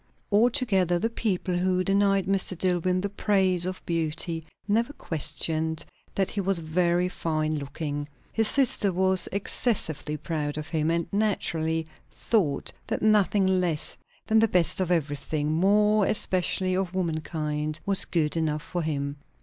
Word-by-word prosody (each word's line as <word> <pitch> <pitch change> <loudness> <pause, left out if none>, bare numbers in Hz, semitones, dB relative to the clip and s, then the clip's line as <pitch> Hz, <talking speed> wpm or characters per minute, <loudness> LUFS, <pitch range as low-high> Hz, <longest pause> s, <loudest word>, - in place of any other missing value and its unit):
Altogether, 205 - +2
the 225 +6 -2
people 190 -5 -1
who 185 0 0
denied 195 0 +2
Mr. 190 -2 +2
Dillwyn 180 0 0
the 200 - -1
praise 190 -3 +1
of 185 0 -6
beauty, 165 0 -1 0.2
never 230 +6 0
questioned 160 - -1 0.3
that 195 -1 0
he 205 - -2
was 195 0 +2
very 170 +2 +1
fine 155 -3 -2
looking. 145 +1 -5 0.2
His 225 -1 +2
sister 240 -7 +2
was 185 0 +5
excessively 185 - +1
proud 150 -1 -4
of 155 0 -6
him, 160 -1 -1
and, 170 0 0
naturally 165 -6 0 0.2
thought 170 -12 -1
that - - -3
nothing 210 -2 +3
less 180 -5 0 0.3
than 220 0 +3
the 225 - +4
best 180 -1 +2
of 180 - -1
everything 150 -2 -1
more 205 +4 +3
especially 185 -2 +3
of 185 -1 -2
womankind 155 -3 -3
was 200 0 +1
good 160 -3 -1
enough 155 -2 -1
for 175 - -4
him. 140 -2 -3
180 Hz, 140 wpm, -26 LUFS, 155-195 Hz, 0.3 s, was